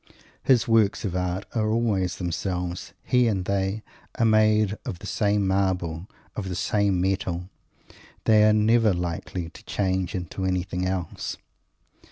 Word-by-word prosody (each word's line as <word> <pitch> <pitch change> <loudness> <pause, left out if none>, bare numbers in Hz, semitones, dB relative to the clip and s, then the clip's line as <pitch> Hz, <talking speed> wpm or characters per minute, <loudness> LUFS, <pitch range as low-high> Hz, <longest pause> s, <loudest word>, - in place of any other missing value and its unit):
His 125 -3 +3
works 110 -2 +3
of 95 -3 -2
art 90 +1 -2
are 110 -2 +1
always 105 -5 +1
themselves. 90 0 -3
He 125 -1 +3
and 95 -5 0
they 100 +2 -1 0.3
are 115 - +3
made 110 -1 +4
of 90 - -5
the - - -11
same 105 -1 +1
marble, 95 -2 0 0.3
of 95 -3 -4
the 90 - -3
same 100 0 +1
metal. 95 -1 -1 0.7
They 110 -1 +5
are 110 - +5
never 110 -1 +4
likely 85 0 -4
to - - -14
change 95 -2 -1
into 90 +1 -4
anything 90 0 -1
else! 90 -3 -3
95 Hz, 145 wpm, -25 LUFS, 90-110 Hz, 0.7 s, They